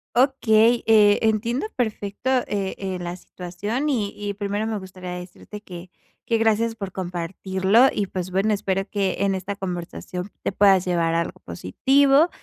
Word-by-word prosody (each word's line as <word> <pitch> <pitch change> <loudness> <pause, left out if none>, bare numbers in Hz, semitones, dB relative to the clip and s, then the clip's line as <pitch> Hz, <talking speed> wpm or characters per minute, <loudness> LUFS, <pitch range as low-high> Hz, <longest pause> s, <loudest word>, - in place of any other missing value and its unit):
Okey, 240 -3 +4
eh, 210 -2 +6
entiendo 230 - 0
perfecto, 220 +1 -2 0.2
eh 195 -2 -2
eh, 190 -2 -3
la 175 0 -5
situación. 205 +11 -4
Y 215 -7 0
y 205 -1 -3
primero, 205 +1 -2
me 220 -2 -2
gustaría 185 -1 -9
decirte 180 +3 -9
que 180 -2 -10 0.3
que, 230 - +1
gracias 225 +1 +1
por 200 -4 -6
compartirlo, 190 +5 +1
y 205 - -1
pues, 185 0 -4
bueno, 195 +4 +1
espero 195 -1 -1
que 195 -2 -1
en 195 -1 +2
esta 190 +2 -4
conversación, 180 0 -5
te - - 0
puedas 195 -2 +4
llevar 170 -2 +1
algo 170 - -2
positivo, 275 - +3
200 Hz, 155 wpm, -23 LUFS, 185-220 Hz, 0.3 s, eh